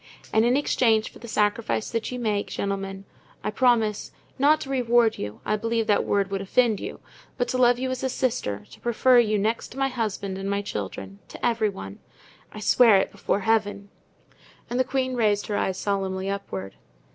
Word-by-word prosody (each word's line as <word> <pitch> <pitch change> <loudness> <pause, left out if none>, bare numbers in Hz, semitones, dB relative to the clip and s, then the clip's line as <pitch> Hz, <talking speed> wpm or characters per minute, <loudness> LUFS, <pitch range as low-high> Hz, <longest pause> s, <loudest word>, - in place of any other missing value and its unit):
And 220 - +4
in 245 +3 +3
exchange 225 -6 +2
for - - -15
the 235 - -10
sacrifice 210 0 0
that 230 +1 -2
you 250 - -4
make, 210 -4 -1
gentlemen, 195 -1 -4 0.4
I 210 - -1
promise—not 245 +5 +1
to 270 - -6
reward 240 -3 +2
you, 105 0 -6
I 215 - +1
believe 230 +1 -1
that 210 -1 +2
word 200 -1 0
would 195 -1 -2
offend 220 +1 +2
you—but 245 - -7
to 255 - -1
love 245 -1 +5
you 260 +1 -2
as 255 - -3
a 265 - +1
sister, 230 - -2
to - - -14
prefer 245 +1 +4
you, 215 -3 +2
next 220 +3 -1
to - - -12
my 270 0 +1
husband 210 -6 -3
and 195 +1 -3
my 200 0 -1
children, 100 - -6
to - - -6
every 230 -3 +2
one. 95 - -8 0.5
I 215 - -9
swear 225 -1 +5
it 190 - 0
before 200 - -1
Heaven." 205 -2 0 0.8
And 245 - 0
the - - +5
queen 260 0 -1
raised 210 -4 +1
her 210 - -3
eyes 190 -2 -1
solemnly 195 -1 -2
upward. 95 - -6
215 Hz, 190 wpm, -25 LUFS, 200-245 Hz, 0.8 s, love